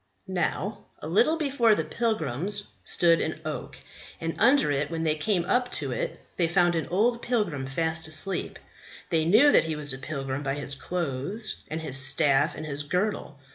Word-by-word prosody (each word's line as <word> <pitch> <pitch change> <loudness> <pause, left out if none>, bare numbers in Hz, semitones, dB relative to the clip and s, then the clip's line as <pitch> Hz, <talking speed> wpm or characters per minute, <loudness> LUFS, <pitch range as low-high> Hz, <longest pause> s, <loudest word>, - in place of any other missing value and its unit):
"Now, 190 +1 -2
a - - -8
little 240 - +3
before 270 -8 +3
the - - -1
pilgrims 205 - -1
stood 170 -1 +3
an 160 0 -3
oak, 150 -4 -5 0.4
and 165 0 -3
under 250 - +4
it 145 +1 -1
when 165 -1 -3
they 155 -1 +2
came 175 +3 0
up 245 +6 +1
to - - -1
it - - -3 0.2
they 170 - +2
found 175 +1 +3
an 165 -2 -2
old 235 +6 +1
pilgrim 185 - -1
fast 160 +3 -1
asleep; 155 +5 -2 0.5
they 160 -2 +2
knew 225 - +6
that - - +5
he 160 -1 -2
was 145 -2 -1
a 130 - -7
pilgrim 135 -1 -4
by 135 -1 -2
his 145 -1 -4
clothes 170 - -4
and 160 +1 -4
his 135 -4 +2
staff 140 +2 +3
and 155 - -6
his 145 -1 -4
girdle. 180 -1 -2
165 Hz, 180 wpm, -26 LUFS, 145-210 Hz, 0.5 s, knew